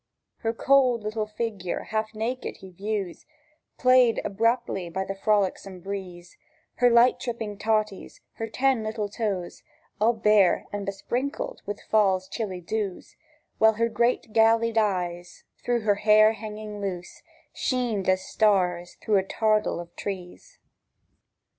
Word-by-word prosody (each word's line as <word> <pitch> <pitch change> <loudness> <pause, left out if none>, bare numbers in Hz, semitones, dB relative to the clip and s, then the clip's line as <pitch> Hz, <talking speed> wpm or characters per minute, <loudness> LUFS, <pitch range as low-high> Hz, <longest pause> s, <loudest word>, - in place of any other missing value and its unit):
Her 225 - -1
cwold 250 -1 +3
little 215 0 -2
figure 210 -4 -4
half 215 0 -2
naked 235 +4 -3
he 190 - -12
views 195 -1 -4 0.5
Played 255 -3 +5
about 230 +4 +1
by 190 -1 -4
the 195 - -2
frolicsome 195 -2 0
breeze, 180 -2 -7 0.4
Her 245 0 +5
light 240 +1 +5
tripping 230 -5 -5
totties, 215 -2 -1 0.2
her 225 - -3
ten 260 +1 +1
little 215 -1 -3
tooes, 200 -4 -4 0.4
All 225 +3 +4
bare 210 -4 +3
and 205 -1 -4
besprinkled 245 +8 -3
wi' 205 - -2
Fall's 190 -3 +2
chilly 195 -4 -4
dews, 200 +1 -4 0.4
While 220 0 +6
her 230 +2 0
great 235 0 0
gallied 225 +1 +4
eyes, 180 -4 -2 0.2
through 240 -1 0
her 210 -1 +3
hair 215 0 +6
hanging 215 -1 -7
loose, 180 -3 -5 0.3
Sheened 235 -7 -1
as 185 0 +2
stars 180 -5 +1
through 210 -2 +3
a 190 - +2
tardle 215 0 +1
o' 175 -1 -8
trees. 195 - -7
215 Hz, 135 wpm, -26 LUFS, 195-230 Hz, 0.5 s, While